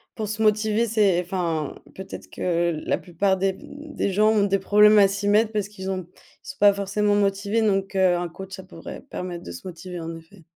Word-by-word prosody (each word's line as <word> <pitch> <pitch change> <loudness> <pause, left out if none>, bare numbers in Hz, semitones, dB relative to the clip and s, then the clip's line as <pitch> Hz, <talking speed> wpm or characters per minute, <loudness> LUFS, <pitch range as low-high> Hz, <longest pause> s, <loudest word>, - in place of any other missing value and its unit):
pour 215 -2 -3
se 215 +1 -3
motiver, 215 +1 +2
c'est 205 -5 +3
enfin, 170 -5 -2 0.2
peut-être 190 0 -9
que 170 -3 -1
la - - +1
plupart 190 +2 0
des, 190 +1 +1
mmh, 290 +9 -12
des 200 - 0
gens 215 +3 +4
ont 215 -2 +3
des 195 0 +1
problèmes 210 +2 +5
à 200 -1 +7
s'y 200 +1 -3
mettre 210 +2 +3
parce 210 -2 -1
qu'ils 195 -2 -7
ont 185 -2 -3
ils - - -23
sont 280 - -7
pas 205 -1 +6
forcément 200 +1 0
motivés, 200 +2 +1
donc 195 -2 0
heu, 185 -2 +4
un 175 0 -2
coach, 190 +3 -10
ça 190 - -10
pourrait 165 -3 -10
permettre 180 -1 -7
de - - -8
se 85 - -9
motiver 180 0 -8
en 165 0 -6
effet. 165 +2 -17
195 Hz, 220 wpm, -24 LUFS, 180-210 Hz, 0.2 s, à